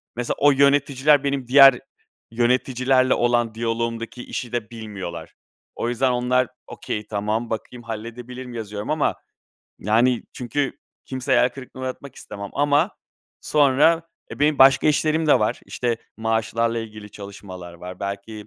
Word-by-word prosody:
mesela 120 0 -2
o 145 +1 +6
yöneticiler 140 +1 +3
benim 140 -3 -2
diğer 135 -1 +8 0.5
yöneticilerle 130 +2 +2
olan 120 -2 +1
diyaloğumdaki 115 +1 -3
işi 120 - -5
de 120 -1 -3
bilmiyorlar. 95 -8 -7 0.4
O 120 - -2
yüzden 125 +2 +1
onlar 125 +1 +1 0.2
okay, 105 - -5
tamam, 110 +2 -2
bakayım, 120 +2 -6
halledebilirim, 120 +3 -7
yazıyorum 105 -2 -6
ama 155 -1 +1 0.6
yani, 115 +4 +2
çünkü 135 +3 -2 0.3
kimseyi 130 -1 -1
hayal 125 - +4
kırıklığına 130 0 -9
uğratmak 130 +1 -6
istemem. 100 -1 -8
Ama 145 +5 +2 0.5
sonra, 150 +3 +3 0.3
e, - - -8
benim 150 0 +3
başka 135 0 +6
işlerim 155 +1 +2
de 150 - +5
var. 105 - -1
İşte, 120 -2 -2 0.2
maaşlarla 115 +1 0
ilgili 110 -2 -8
çalışmalar 95 -3 -10
var, 90 +1 -10
belki, 100 +2 -6
120 Hz, 135 wpm, -22 LUFS, 110-135 Hz, 0.6 s, diğer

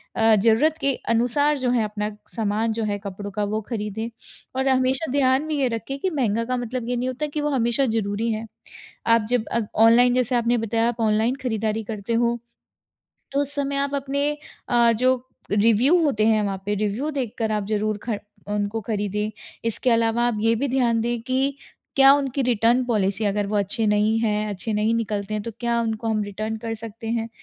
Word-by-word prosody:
अ, 225 -1 +5
ज़रूरत 230 +10 +3
के 275 0 +2 0.2
अनुसार 265 +6 +2
जो 255 - 0
है 235 -3 +2
अपना 210 0 -3 0.2
सामान 220 0 0
जो 225 0 -2
है 205 -1 -1
कपड़ों 200 +1 -6
का 210 +2 -2
वो 215 +2 -1
ख़रीदें। 220 0 -3 0.5
और 265 +1 0
हमेशा 260 +2 +1
ध्यान 265 0 +3
में 310 - -2
ये 275 -3 +2
रखें 270 +5 -5
कि 375 - 0
महँगा 230 - 0
का 255 +1 -1
मतलब 245 0 -4
ये 245 - 0
नहीं 250 +1 -1
होता 280 +4 -3
कि 295 +1 -3
वो 295 - 0
हमेशा 250 0 +2
ज़रूरी 220 0 -1
है। 220 +1 -4 0.6
आप 230 -2 +4
जब 245 -3 +1
अ, 235 - +1 0.2
ऑनलाइन 245 +2 +6
जैसे 250 0 +1
आपने 240 0 +2
बताया 225 +1 0
आप 240 0 -5
ऑनलाइन 220 +3 +2
ख़रीदारी 220 -2 -1
करते 215 +1 -4
हो 235 +1 +2 1.0
तो 280 - +1
उस 285 0 -5
समय 280 -1 -1
आप 280 0 -1
अपने 280 +1 0 0.4
अ, 235 -1 +5
जो 255 +2 +1 0.3
रिव्यू 230 - +4
होते 215 -8 +2
हैं 220 -1 +3
वहाँ 195 -1 -3
पे 205 - +1
रिव्यू 215 +9 -1
देख 260 -7 -3
कर 220 -2 0
आप 210 -2 -1
ज़रूर 215 0 0
खर 220 -4 -3 0.3
उनको 205 +2 -1
ख़रीदें। 210 0 -1 0.3
इसके 230 +2 0
अलावा 230 0 +2
आप 235 - -1
ये 225 +1 +3
भी 275 +5 -1
ध्यान 240 -3 +2
दें 240 0 -1
कि 265 +3 0 0.4
क्या 270 0 +8
उनकी 275 -1 -1
रिटर्न 240 +1 +3
पॉलिसी 205 -2 0
अगर 205 0 0
वो 210 - -1
अच्छे 205 +2 0
नहीं 210 +2 +2
है, 210 -1 0
अच्छे 205 +3 -4
नहीं 215 +2 +1
निकलते 215 -2 -2
हैं 210 - -2
तो 230 - -4
क्या 235 -1 +1
उनको 225 0 -2
हम 215 -1 +1
रिटर्न 215 +2 -4
कर 225 0 -4
सकते 225 +1 -9
हैं? 230 0 -1
230 Hz, 205 wpm, -23 LUFS, 215-255 Hz, 1.0 s, क्या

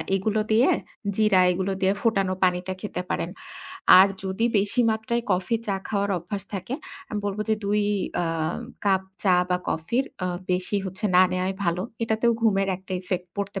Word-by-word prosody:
এগুলো 215 +3 0
দিয়ে, 230 +4 +5 0.5
জিরা 210 -3 +4
এগুলো 190 +2 -1
দিয়ে 190 0 +3
ফোটানো 195 -5 +1
পানিটা 180 0 +1
খেতে 210 - -4
পারেন। 170 - -1 0.7
আর 190 - +8 0.2
যদি 190 +4 -1
বেশি 205 +5 +1
মাত্রায় 220 +2 -1
কফি 185 +6 +1
চা 200 -2 0
খাওয়ার 200 -1 0
অভ্যাস 195 +4 -5
থাকে, 195 +6 -3 0.3
আমি 210 - -3
বলব 200 0 -3
যে 220 - +4
২ 205 +1 +2 0.4
আ - - 0 0.6
কাপ 190 -2 +3 0.2
চা 190 -3 +4 0.2
বা 180 - +2
কফির 235 +12 0 0.2
আ - - 0 0.3
বেশি 180 +3 0
হচ্ছে 190 +3 -6
না 185 - +8
নেওয়াই 185 +1 -1
ভালো। 175 +1 0 0.2
এটাতেও 225 +1 +2
ঘুমের 195 -3 +3
একটা 190 +1 -10
ইফেক্ট 180 -1 -3
পড়তে 200 -1 -3
195 Hz, 170 wpm, -25 LUFS, 185-215 Hz, 0.7 s, আর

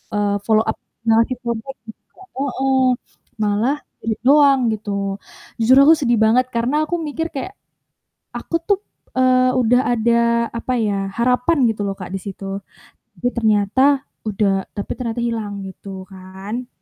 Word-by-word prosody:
eee, 205 -1 +1
follow 220 -1 +4
up, 220 - -2 0.3
nggak 225 -1 +4
ngasih 250 +2 +1
kontak 235 +3 -4
juga, 220 - -15 0.2
heeh. 270 -1 0 0.6
Malah 215 +7 +1 0.2
di-read 220 -1 -3
doang 280 -1 +6
gitu. 200 -2 -3 0.4
Jujur 240 +4 +5
aku 320 - +9
sedih 240 -6 +1
banget 230 +3 +4
karena 255 +7 +1
aku 345 +1 -2
mikir 325 +1 -3
kayak 280 +8 -5 0.8
aku - - -4
tuh, 405 -2 +2 0.3
eee, 255 0 +3
udah 245 0 +3
ada 235 0 +2
apa 235 +2 -3
ya, 200 -2 0
harapan 250 +6 +2
gitu 215 -2 -3
loh, 195 - -1
Kak, 185 -2 -7
di 195 - -2
situ. 195 0 -6 0.6
Tapi 245 - -1
ternyata 235 +6 +3 0.2
udah 195 -2 0
tapi 205 - -4
ternyata 235 -1 -3
hilang 215 -4 -3
gitu 190 0 -9
kan. 190 +6 -7
230 Hz, 145 wpm, -20 LUFS, 205-255 Hz, 0.8 s, aku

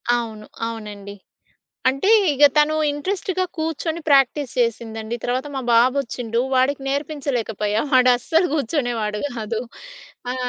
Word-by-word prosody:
అవును, 220 -3 -4 0.2
అవునండి. 205 -3 -7 0.7
అంటే 275 +9 0 0.2
ఇగ 285 +1 +4
తను 300 +1 +4 0.2
ఇంట్రెస్ట్‌గా 370 +4 -2
కూర్చొని 320 +1 -2
ప్రాక్టీస్ 275 -1 +3
చేసిందండి. 225 -1 -2
తర్వాత 255 +3 -1
మా 270 - -2
బాబొచ్చిండు. 240 -1 +1
వాడికి 270 +2 +2
నేర్పించలేకపోయా. 255 -7 -2
వాడస్సలు 255 +7 +4
కూర్చునేవాడు 235 -7 -1 0.2
కాదు. 220 0 -3 0.7
ఆ! - - -4
255 Hz, 105 wpm, -21 LUFS, 225-290 Hz, 0.7 s, ఇగ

